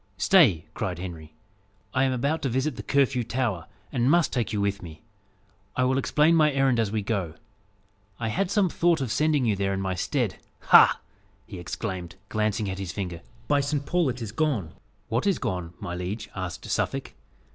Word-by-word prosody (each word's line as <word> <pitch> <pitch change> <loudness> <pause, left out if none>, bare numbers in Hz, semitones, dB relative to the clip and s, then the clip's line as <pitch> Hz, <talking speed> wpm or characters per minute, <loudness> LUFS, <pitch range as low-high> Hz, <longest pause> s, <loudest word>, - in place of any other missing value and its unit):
"Stay!" 120 - +5
cried - - -3
Henry, 85 -4 -8 0.6
"I 130 +1 +3
am 130 - +1
about 140 +6 0
to 135 - -1
visit 130 +3 -1
the - - -6
Curfew 135 -3 +2
Tower, 115 -7 -2 0.2
and 120 +1 +1
must 170 +1 +3
take 120 -4 -1
you 105 - -1
with 100 0 -1
me. 80 -3 -11 0.7
I 130 - +2
will 130 +1 +2
explain 150 +4 +3
my 155 -2 +4
errand 135 -3 +2
as 110 -3 0
we 110 -1 -1
go. 95 -7 -2 0.8
I 110 -1 -1
had 185 - 0
some 200 -1 +3
thought 170 -1 +2
of 130 -5 -2
sending 150 -2 +2
you 110 -3 +2
there 100 0 -1
in - - -3
my 95 -1 -1
stead. 90 - -1 0.3
Ha!" - - +8 0.5
he 95 -5 -9
exclaimed, 90 -1 -5
glancing 105 -1 0
at 95 0 -4
his 95 -4 -4
finger, 90 -4 -5 0.3
"By 145 -1 +3
Saint 140 0 -1
Paul, 175 -1 +1
it 125 -1 -4
is 105 - -5
gone!" 120 - -1 0.3
"What 120 - 0
is 195 - +3
gone, 90 -2 -4
my 90 -4 -5
liege?" 90 +5 -4
asked 95 -3 -5
Suffolk. - - -2
115 Hz, 190 wpm, -26 LUFS, 95-140 Hz, 0.8 s, Ha